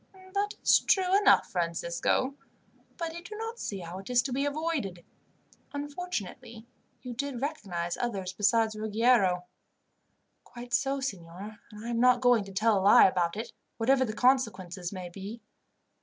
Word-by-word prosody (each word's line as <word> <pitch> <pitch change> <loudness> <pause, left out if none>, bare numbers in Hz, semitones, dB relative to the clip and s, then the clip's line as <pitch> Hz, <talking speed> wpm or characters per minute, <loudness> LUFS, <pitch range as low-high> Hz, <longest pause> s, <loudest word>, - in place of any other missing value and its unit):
"That 410 +1 -1
is - - +6
true 375 -1 +2
enough, 410 - +5
Francisco, 170 +9 0 0.6
but 330 -1 -4
I 340 - -6
do 425 +5 -9
not 450 +2 -5
see 195 -3 -4
how 175 +2 -7
it 195 - -10
is 245 0 +3
to 265 - -3
be 275 +2 0
avoided. 285 - -3 0.7
Unfortunately, 270 - -5 0.4
you 250 -1 -5
did 270 +1 -4
recognize 190 - -3
others 195 -6 -3
besides 215 +2 +2
Ruggiero." 215 -4 +2 1.0
"Quite 240 +1 -10
so, 275 0 +1
signor, 200 -2 -6
and 210 +1 -10
I - - -4
am 235 -1 -1
not 250 0 +5
going 245 -3 +4
to 195 - -10
tell 215 +1 +2
a - - -2
lie 200 - +8
about 180 -1 +1
it, 230 +2 -5 0.2
whatever 260 +3 +3
the 220 -4 -3
consequences 195 -8 +1
may 185 -3 -6
be. 200 +6 -8
230 Hz, 155 wpm, -29 LUFS, 190-270 Hz, 1.0 s, lie